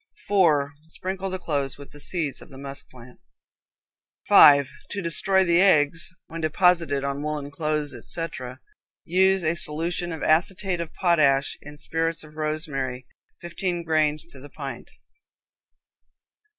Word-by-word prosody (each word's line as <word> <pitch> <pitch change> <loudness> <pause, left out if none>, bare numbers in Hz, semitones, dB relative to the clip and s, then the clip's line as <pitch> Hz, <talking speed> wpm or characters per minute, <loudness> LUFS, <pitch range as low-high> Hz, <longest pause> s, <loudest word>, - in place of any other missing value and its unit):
4. 160 -8 +3
Sprinkle 190 +3 -4
the 185 - -3
clothes 140 -6 -2
with 140 0 -12
the 145 - -12
seeds 155 -2 -2
of - - -13
the 135 - -12
musk 140 0 -3
plant. 125 0 -15 1.1
5. 140 -1 +8 0.2
To 205 - -4
destroy 190 +3 +3
the 170 0 +3
eggs, 160 -4 +3 0.2
when 165 0 -7
deposited 160 -3 +2
in 140 0 -3
woolen 150 -1 -4
cloths, 150 -1 -2
etc., 130 -7 -5 0.5
use 190 +2 +3
a 160 +1 +1
solution 170 +2 -3
of 160 - -6
acetate 180 +3 +1
of 165 - -6
potash 145 -7 +2
in 150 0 -11
spirits 165 +1 -2
of 155 0 -15
rosemary, 150 -5 -3 0.4
fifteen 175 0 -3
grains 155 -2 +1
to 155 -5 -9
the 145 +2 -12
pint. 140 -2 -8
155 Hz, 135 wpm, -24 LUFS, 145-175 Hz, 1.1 s, 5